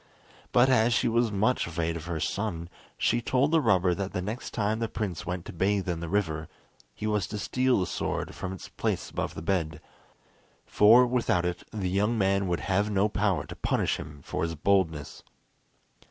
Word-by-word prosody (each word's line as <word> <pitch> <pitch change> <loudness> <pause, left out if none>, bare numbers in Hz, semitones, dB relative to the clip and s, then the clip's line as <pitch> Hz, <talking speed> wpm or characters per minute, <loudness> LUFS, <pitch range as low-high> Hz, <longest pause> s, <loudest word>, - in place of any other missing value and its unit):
But 125 +1 +5
as 120 -2 +4
she 125 - +2
was 115 -1 +2
much 105 +3 +1
afraid 85 0 -2
of 80 -1 -6
her 85 -2 -3
son, 85 -3 -2 0.3
she 120 +1 +1
told 130 +5 +1
the 165 -1 +4
robber 95 -7 +3
that 95 +1 -4
the - - -1
next 110 +5 -4
time 110 0 0
the 115 - 0
prince 100 -7 -4
went 90 -1 -3
to - - -8
bathe 95 +3 0
in 85 -2 -1
the 85 -1 -5
river, 80 -5 -1 0.5
he - - -5
was 105 -3 0
to 105 - -5
steal 125 +4 +1
the 90 - +1
sword - - -3
from 95 - -5
its 95 - -8
place - - -3
above - - -3
the - - -6
bed, 80 -4 -1 0.9
for 115 +4 +6
without 120 -8 +1
it 90 0 -2
the 100 -4 -2
young 105 +5 +1
man 100 -1 +2
would 85 -1 -1
have 100 +2 +1
no 100 +1 +2
power 100 -3 0
to - - -9
punish - - 0
him 75 -1 -9
for - - -4
his 80 0 -1
boldness. 80 -3 0
100 Hz, 195 wpm, -28 LUFS, 85-110 Hz, 0.9 s, for